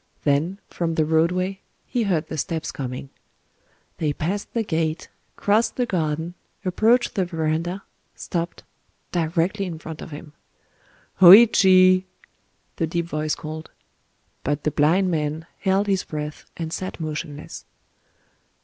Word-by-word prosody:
Then, 155 +7 +1
from 165 -2 -2
the 155 - +2
roadway, 180 +5 +1 0.2
he 245 - -1
heard 170 -5 +1
the 160 - -6
steps 160 +3 -2
coming. 130 0 -6 0.9
They 150 -3 0
passed 190 +8 -3
the 230 - +1
gate, 160 -4 -2 0.3
crossed 215 +3 +2
the 250 - +1
garden, 160 -3 -2 0.3
approached 220 +7 +3
the 195 - +1
verandah, 170 +2 -2 0.3
stopped—directly 170 +2 -3
in 165 -3 -5
front 160 0 -8
of - - -8
him. 150 0 -10 0.9
"Hōïchi!" 185 -2 +8 0.7
the 165 - 0
deep 170 +1 -1
voice 155 -2 -2
called. 155 +1 -7 0.7
But 145 +1 -1
the 150 - +1
blind 175 +7 +3
man 155 0 -2
held 195 +1 +2
his 195 -2 +1
breath, 150 0 -6
and 160 -1 -4
sat 185 -1 -5
motionless. 155 -1 -6
165 Hz, 125 wpm, -23 LUFS, 155-190 Hz, 0.9 s, Hōïchi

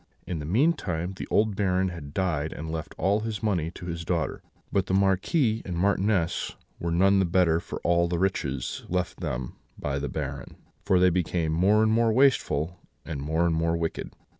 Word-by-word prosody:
In 85 -3 -3
the 75 - -5
meantime 95 - +1
the - - -6
old 105 -1 +2
Baron 95 -2 +1
had 80 -5 -8
died 80 -3 -1
and 80 +1 -6
left 80 -1 -5
all 100 +4 +2
his 110 0 -4
money 90 -7 0
to 85 - -8
his 85 -1 -4
daughter; 85 -1 -1 0.3
but 95 -2 +1
the 95 - +1
Marquis 110 - +2
and 90 -3 -4
Marchioness 95 -1 +1 0.2
were 85 - -2
none 95 +4 +4
the - - +4
better 85 -2 +3
for - - -7
all 85 0 +3
the 85 0 -1
riches 75 -8 -1
left 90 0 -2
them - - -4 0.2
by 70 -1 -2
the 75 - -3
Baron, - - -5 0.3
for 95 - +3
they 90 0 +5
became 85 -2 0
more 100 +6 +4
and 110 - +3
more 115 0 +3
wasteful, 110 - +2 0.3
and 75 -4 -4
more 80 +4 +1
and 85 - +2
more 85 +1 +1
wicked. 80 -1 -3
90 Hz, 190 wpm, -27 LUFS, 80-100 Hz, 0.3 s, they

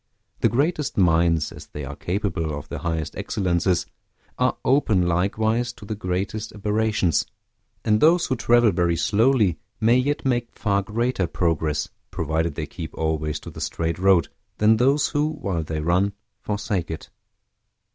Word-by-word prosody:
The - - +3
greatest 150 +4 0
minds, 85 -3 +3
as - - -11
they 75 -1 -7
are 70 +2 -7
capable 85 -5 -2
of 75 - -9
the - - -5
highest 80 -2 -3
excellences, 90 -1 0 0.5
are 125 0 +2
open 115 -10 +3
likewise 110 +7 +1
to 115 - -13
the 110 - -3
greatest 100 +2 -3
aberrations; 105 -4 +1 0.6
and 105 0 +3
those 170 +3 +5
who 130 - 0
travel 120 -1 +4
very 85 -2 +1
slowly 110 - +2 0.2
may 115 +3 +4
yet 140 +3 0
make 120 -2 -1
far 100 -2 +1
greater 110 -1 -1
progress, 80 -3 0 0.2
provided 80 0 -1
they - - -3
keep - - -8
always 80 -1 -1
to - - -9
the - - -9
straight 85 +1 -2
road, 95 -3 +4 0.3
than 110 +1 +4
those 140 +5 +3
who, 150 +2 0
while 100 - -2
they 80 0 -3
run, 90 +5 +2 0.3
forsake 100 -4 -2
it. 80 - -7
100 Hz, 155 wpm, -23 LUFS, 85-115 Hz, 0.6 s, those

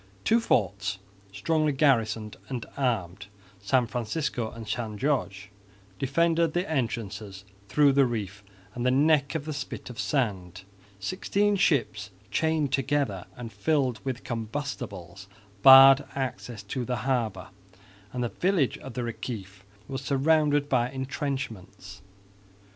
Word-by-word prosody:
Two 230 - +4
forts 100 - 0 0.3
strongly 155 +9 +1
garrisoned 115 -6 +1
and 125 -4 -4
armed, 100 -8 -2 0.3
San 120 +6 +2
Francisco 120 0 -2
and 115 -1 -10
San 110 0 -3
Jorge, 100 -8 -1 0.5
defended 165 +3 +2
the 175 +1 -1
entrances 105 -8 -3 0.2
through 145 +5 +5
the 135 -1 +4
reef 105 -3 -5 0.3
and 120 - -4
the 125 - +3
neck 140 +2 +3
of 150 -2 -3
the 155 - -4
spit 140 -2 -6
of 120 - -11
sand; 95 - -2 0.4
sixteen 200 - 0
ships 115 - +1 0.2
chained 160 0 0
together 135 -9 0
and 115 -3 -8
filled 130 +1 0
with 130 -2 -4
combustibles 110 -6 -5 0.3
barred 135 +2 +9
access 125 -5 -4
to 125 +5 -4
the 125 +1 -2
harbour; 115 -8 -1 0.6
and 125 -1 -3
the 120 - -1
village 175 -5 0
of 130 -3 -10
the 125 - -2
Reciff 105 -5 -6 0.3
was 135 -2 -4
surrounded 145 +1 +2
by 125 -3 +1
entrenchments. 130 - -5
125 Hz, 125 wpm, -27 LUFS, 105-140 Hz, 0.6 s, barred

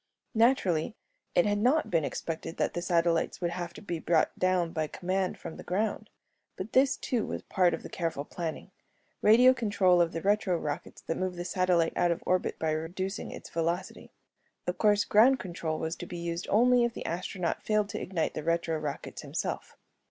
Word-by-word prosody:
Naturally, 220 -7 +2 0.4
it 175 - +5
had 205 0 +1
not 260 +8 +2
been 165 -3 +2
expected 165 +2 -4
that - - 0
the 175 - -2
satellites 170 -2 +1
would 175 -2 -1
have 175 -1 -4
to - - -10
be 175 -5 -3
brought 160 0 +2
down 185 -2 +1
by 155 -1 -1
command 185 +3 -2
from 160 - -8
the - - -9
ground. 210 +3 -2 0.5
But 190 +4 -6
this, 265 +1 +4
too, 240 -5 -1
was - - -4
part 180 -3 +2
of - - -11
the - - -6
careful 165 -5 -3
planning 165 -1 -5 0.5
radio 245 +4 +7
control 205 -7 +3
of 170 -1 +2
the 165 - -5
retro 200 -3 +2
rockets 150 -2 -5
that 165 - -3
move 185 -1 -2
the 175 0 -5
satellite 180 -3 +2
out 175 - +2
of 170 - -1
orbit 185 0 0
by 160 -1 0
reducing 180 +6 -3
its - - -9
velocity. 170 +3 -2 0.6
Of 180 - -3
course, 210 -1 +4
ground 245 +6 +5
control 170 -7 -4
was 160 +1 -3
to 175 - -7
be 175 - -6
used 170 +1 -4
only 245 +3 +5
if 235 -1 -1
the - - -6
astronaut 180 +1 -2
failed 215 -1 +1
to - - -4
ignite 175 -4 -1
the - - -4
retro 165 -1 0
rockets 150 -2 -5
himself. - - -4
180 Hz, 195 wpm, -29 LUFS, 165-205 Hz, 0.6 s, radio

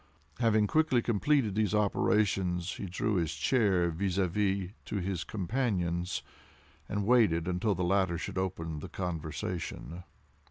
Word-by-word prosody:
Having 110 -3 +3
quickly 130 -2 +2
completed 120 0 +2
these 105 0 +1
operations, 95 -4 +1
he 100 - -5
drew 100 +3 -1
his 80 -2 -1
chair 90 - +2
vis 95 +3 -2
à 95 -2 +3
vis 95 0 0
to - - -5
his 95 -3 -2
companion's, 90 - -1 0.7
and 105 0 -1
waited 105 -9 +4
until 90 +3 0
the 90 - -1
latter 90 -1 +2
should 90 - -4
open 80 -4 -3
the - - -8
conversation. 85 0 -4
95 Hz, 135 wpm, -30 LUFS, 85-105 Hz, 0.7 s, waited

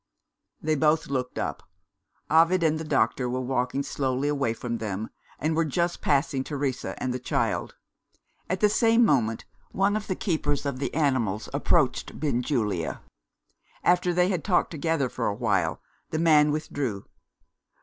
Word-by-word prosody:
They 155 0 0
both 155 0 +2
looked 125 -2 -2
up. - - -3 0.7
Ovid 165 +3 +4
and 160 -1 +2
the - - -4
doctor 130 -4 +1
were 125 +1 -1
walking 130 +1 -1
slowly 135 0 -1
away 140 -5 0
from 115 0 -4
them, 105 0 -4 0.3
and 155 +2 -1
were 165 - +3
just 170 +3 -1
passing 140 -2 +1
Teresa 140 -3 -3
and 125 - -2
the 130 - -3
child. 125 - -1 0.7
At 185 +1 -1
the 210 - +6
same 230 +2 +4
moment, 115 - +1 0.2
one 200 +2 +1
of 215 -1 -3
the 185 - -1
keepers 145 -7 -1
of 140 -2 -2
the 140 - -2
animals 130 -9 0
approached - - +1
Benjulia. 120 - -1 0.8
After 180 0 +3
they 180 +1 +2
had 180 -5 -1
talked 185 -4 +2
together 160 -3 0
for 120 -1 -3
a 100 - -1
while, 95 -8 0 0.3
the 155 - -2
man 155 -2 +5
withdrew. 140 -9 -3
145 Hz, 155 wpm, -26 LUFS, 125-160 Hz, 0.8 s, the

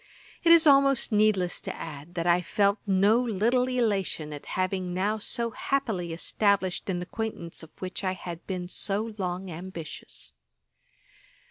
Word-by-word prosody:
It 335 - +6
is 335 -1 +8
almost 275 -4 +5
needless 210 -4 +2
to - - -5
add, 155 +2 -8
that 170 -1 -1
I 175 0 +4
felt 200 +3 +1
no 200 +4 +4
little 240 +2 +1
elation 200 -11 0
at 145 - -9
having 185 -1 -1
now 205 +4 0
so 235 +2 -1
happily 215 -11 -1
established 190 +2 +1
an 180 -1 -1
acquaintance 185 -3 -5
of 160 - -10
which 185 +1 -5
I 185 -1 0
had 175 -2 -8
been 180 -2 -3
so 210 +4 -2
long 180 0 -3
ambitious. 170 -1 -8
190 Hz, 145 wpm, -27 LUFS, 175-220 Hz, -, is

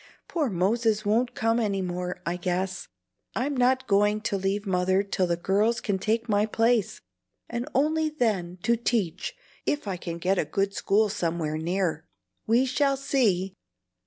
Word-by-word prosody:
Poor 310 -6 0
Moses 215 +3 +1
won't 230 +4 +1
come 225 +1 +1
any 205 -4 0
more, 180 0 -4
I 170 - -1
guess. 185 +1 -2 0.5
I'm 275 +4 -1
not 255 +1 +2
going 205 0 +2
to 220 -2 -1
leave 195 +2 -1
Mother 185 0 +2
till 195 -2 0
the 170 0 0
girls 205 +6 +1
can 195 -2 -1
take 225 +4 0
my 210 -1 +2
place, 225 -1 +1 0.5
and 240 +4 -4
only 310 +3 +2
then 210 - -1
to 235 - +3
teach, 230 - -1 0.3
if 290 -7 0
I 190 -2 -2
can 170 -1 -5
get 185 +2 +1
a - - +1
good 195 +6 -1
school 210 +2 +2
somewhere 165 -6 -2
near." 175 - -1 0.4
"We 235 +4 +4
shall 275 +1 +1
see!" 210 -9 +1
205 Hz, 160 wpm, -26 LUFS, 185-235 Hz, 0.5 s, We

